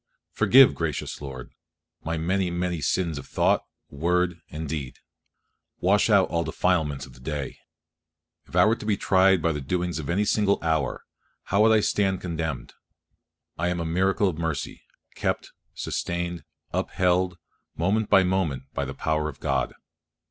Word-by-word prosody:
Forgive, 135 0 +6
gracious 80 -4 -3
Lord, 65 -3 -8 0.5
my 80 +1 -2
many, 90 +3 0
many 85 -1 -2
sins 85 -2 0
of - - -10
thought, - - +2 0.3
word, 85 +3 0
and 80 +1 -5
deed; 70 -4 -5 0.8
wash 100 +5 +3
out 100 -3 +5
all 85 0 0
the 80 - -5
defilements 80 -5 0
of 65 - -15
the - - -16
day. 70 +1 -5 0.9
If - - -11
I - - +6
were 110 +2 +3
to - - -9
be 105 -2 +2
tried 95 -3 +4
by 85 - +3
the 75 -2 -3
doings 90 +4 -2
of 75 - -6
any 100 +5 +1
single 100 -1 +2
hour, 80 -5 0 0.4
how 100 +2 +1
would 110 +1 +6
I 110 -1 +5
stand 95 -3 +1
condemned! 80 -5 -4 0.9
I 85 - +1
am 90 0 -1
a 85 - -2
miracle 95 +4 +2
of 85 -3 -3
mercy; 80 -4 -3 0.3
kept, - - -2 0.2
sustained, 85 -2 -3 0.3
upheld, 90 0 +1 0.4
moment 100 +6 +1
by 95 - +6
moment, 90 -8 0
by 70 - -2
the 70 - -6
power 75 -1 -1
of 70 - -11
God. - - 0
85 Hz, 165 wpm, -25 LUFS, 80-95 Hz, 0.9 s, Forgive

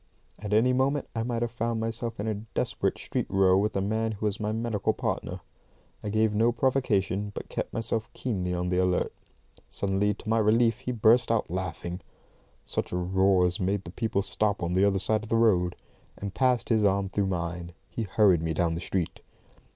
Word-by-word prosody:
At 105 0 -6
any 115 +4 +4
moment 135 +2 +1
I 115 - 0
might 120 0 -1
have 120 - -2
found 115 -1 -2
myself 115 0 -3
in 100 - -2
a 110 - +1
desperate 105 +2 -2
street - - -3
row 95 -1 +4
with 105 +3 +1
a 95 - +1
man 110 +3 0
who 105 +1 -5
was 105 -1 -1
my 105 0 -1
medical 110 -2 0
partner. - - -3 0.6
I 105 - -3
gave 110 +1 +2
no 115 +3 +3
provocation, 110 -6 +1
but - - -6
kept - - -3
myself 115 0 -2
keenly 95 -8 -2
on 90 0 -1
the 90 0 +1
alert. 90 -1 +1 0.6
Suddenly, 100 +1 0
to - - -13
my 115 +1 +2
relief, 115 +2 +3
he 130 -1 -3
burst 115 +1 +4
out 115 -7 0
laughing 90 0 -4 0.6
(such - - -3
a 90 - -1
roar 95 +1 +3
as 90 0 0
made 95 +1 0
the 85 - -9
people 110 -1 -1
stop 105 -2 0
on 85 +1 -1
the 95 +2 +4
other 100 -1 +2
side 110 +3 +1
of 110 - -10
the 115 - +2
road), 95 -6 +3 0.4
and 100 -1 -5
passing 125 -3 +2
his 110 - +1
arm 100 -1 +2
through 100 0 0
mine, 85 -1 -3
he - - -5
hurried 100 -4 +3
me 80 -1 -2
down 85 0 +1
the 85 - -4
street. 90 -2 -2
105 Hz, 205 wpm, -27 LUFS, 95-115 Hz, 0.6 s, any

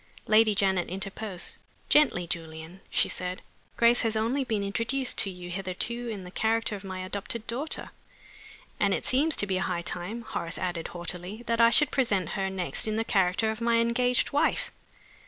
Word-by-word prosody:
Lady 215 -1 +5
Janet 190 -2 +1
interposed. 195 0 -2 0.3
"Gently, 285 -12 +4
Julian," 165 +2 -6
she - - +3
said. 180 0 -4 0.3
"Grace 235 +1 +5
has 225 -2 0
only 235 +6 +1
been 220 -5 -1
introduced 235 +6 0
to 200 - +2
you 180 -1 -8
hitherto 195 +6 -3
in 205 -4 -5
the 180 - -10
character 225 +1 0
of 200 - -9
my 185 -1 -5
adopted 200 +4 -4
daughter 270 +7 -4 0.4
" - - -20
"And - - +3
it - - -5
seems 295 +5 +2
to - - +3
be 190 -2 -1
high 180 -2 -1
time," 190 +8 -4
Horace 170 -6 -4
added, 175 -3 -3
haughtily, 180 +5 -7
"that 230 0 +1
I 230 - +8
should 295 +4 +5
present 200 - +1
her 195 -1 -1
next 190 +2 +1
in 215 - -1
the 225 - +1
character 195 +1 +2
of 220 +1 -7
my 230 0 +3
engaged 240 +2 +2
wife." 290 - +1
205 Hz, 180 wpm, -28 LUFS, 185-230 Hz, 0.4 s, I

